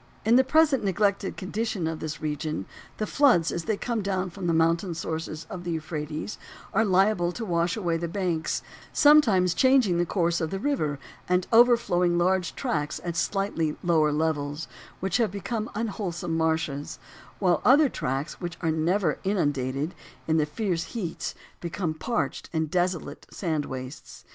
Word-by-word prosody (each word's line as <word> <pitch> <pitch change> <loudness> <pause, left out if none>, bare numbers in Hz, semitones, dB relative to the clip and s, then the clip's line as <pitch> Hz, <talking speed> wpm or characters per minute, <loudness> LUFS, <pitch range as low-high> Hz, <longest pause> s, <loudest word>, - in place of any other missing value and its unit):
In 225 +2 +5
the 260 - +6
present 295 -1 +3
neglected 200 0 0
condition 200 -1 -2
of 160 0 -2
this 155 0 -5
region 150 - -3 0.3
the 215 - -1
floods 225 - +4
as 170 - -3
they 220 -2 0
come 235 0 -2
down 190 -2 -1
from 185 0 -5
the - - +3
mountain 165 +2 +2
sources 160 0 -4
of 175 - -7
the 175 - -4
Euphrates 155 +2 -4 0.3
are 220 - +4
liable 190 -2 +3
to 230 - -5
wash 170 0 0
away 170 -5 0
the 170 +1 -3
banks, 170 -3 -1 0.3
sometimes 220 - +5
changing 255 -7 +4
the 175 - +2
course 170 -2 +1
of 160 - -1
the 195 - -3
river, 190 - -1 0.3
and 180 0 +2
overflowing 210 -8 +4
large 180 0 +1
tracts 150 -2 -2
at 170 -1 -3
slightly 170 -3 0
lower 160 -3 +3
levels, 150 0 -1 0.3
which 190 +2 +1
have 230 -3 +2
become 215 +3 -4
unwholesome 190 -6 -3
marshes, 160 -3 -1 0.4
while 180 -3 +2
other 280 +5 +7
large 280 - 0
tracts 135 +8 -3
which 175 -2 -5
are 165 -2 +1
never 170 +5 +1
inundated, 145 -6 0 0.3
in 160 0 +2
the 150 -1 +2
fierce 170 +1 -1
heats 180 -8 -4 0.2
become 170 -1 -3
parched 230 +10 -2
and 160 -2 -1
desolate 180 -1 -1
sand 160 -6 -2
wastes. 130 +1 -8
175 Hz, 165 wpm, -26 LUFS, 160-205 Hz, 0.4 s, other